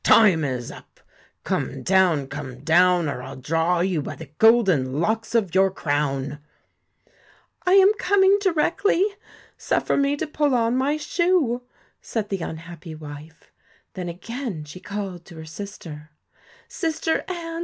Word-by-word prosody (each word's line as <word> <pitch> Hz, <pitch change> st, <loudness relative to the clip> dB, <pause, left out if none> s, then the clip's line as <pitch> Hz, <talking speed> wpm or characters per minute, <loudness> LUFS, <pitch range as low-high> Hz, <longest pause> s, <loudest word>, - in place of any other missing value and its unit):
'Time 190 Hz, -8 st, +5 dB
is 125 Hz, -4 st, -3 dB
up, -, -, -15 dB, 0.4 s
come -, -, -2 dB
down, 180 Hz, -6 st, +3 dB
come 135 Hz, -2 st, -7 dB
down, 175 Hz, +1 st, +4 dB
or 140 Hz, -3 st, -3 dB
I 130 Hz, +1 st, -8 dB
'11 -, -, -12 dB
draw 165 Hz, +4 st, +1 dB
you 180 Hz, -4 st, 0 dB
by -, -, -6 dB
the 155 Hz, -4 st, -11 dB
golden 185 Hz, -, +4 dB
locks 225 Hz, +6 st, -1 dB
of 200 Hz, -7 st, +1 dB
your 190 Hz, +1 st, +4 dB
crown.' 145 Hz, -4 st, -2 dB, 1.3 s
4 365 Hz, -, +4 dB
1 395 Hz, -, +8 dB
am 395 Hz, +2 st, +6 dB
coming 390 Hz, 0 st, +4 dB
directly. 380 Hz, +1 st, +2 dB, 0.5 s
Suffer -, -, 0 dB
me 280 Hz, 0 st, +2 dB
to 320 Hz, -, -2 dB
pull 295 Hz, -3 st, +1 dB
on 230 Hz, 0 st, +2 dB
my 275 Hz, +4 st, +1 dB
shoe,' 310 Hz, -6 st, +1 dB, 0.4 s
said 220 Hz, -3 st, -3 dB
the 195 Hz, -, -2 dB
unhappy 165 Hz, 0 st, -7 dB
wife. 155 Hz, +1 st, -11 dB, 0.4 s
Then 180 Hz, -2 st, -5 dB
again 220 Hz, -, -5 dB
she 150 Hz, +5 st, -10 dB
called 195 Hz, -2 st, -6 dB
to 175 Hz, -, -13 dB
her 160 Hz, 0 st, -9 dB
sister: 160 Hz, -4 st, -9 dB, 0.6 s
'Sister 325 Hz, -2 st, -1 dB
Anne! 335 Hz, -2 st, -5 dB
185 Hz, 150 wpm, -23 LUFS, 155-265 Hz, 1.3 s, 1